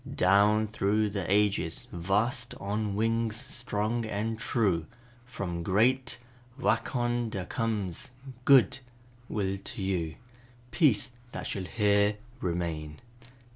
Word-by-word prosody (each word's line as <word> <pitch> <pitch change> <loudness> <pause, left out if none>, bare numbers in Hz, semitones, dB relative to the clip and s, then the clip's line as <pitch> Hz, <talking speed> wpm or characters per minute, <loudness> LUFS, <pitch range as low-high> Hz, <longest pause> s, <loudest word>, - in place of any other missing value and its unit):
"Down 100 +3 +4
through 105 0 +1
the 95 -3 -3
ages 100 -5 +1
vast 105 +8 0
On 105 0 -2
wings 115 +1 +1
strong 120 -3 -1
and 110 +2 -2
true, 95 -10 +1 0.4
From 90 -8 -4
great 120 +7 +2 0.4
Wa 120 - +3
kon 120 0 -1
da 95 -4 -4
comes 110 - -3 0.3
Good 135 -1 +6 0.5
will 95 -2 -1
to 95 - -3
you 85 -5 -1 0.6
Peace 125 - +3 0.2
that - - -5
shall 95 -3 -3
here 105 0 +2 0.2
remain." 85 -5 -3
105 Hz, 110 wpm, -29 LUFS, 95-115 Hz, 0.6 s, Good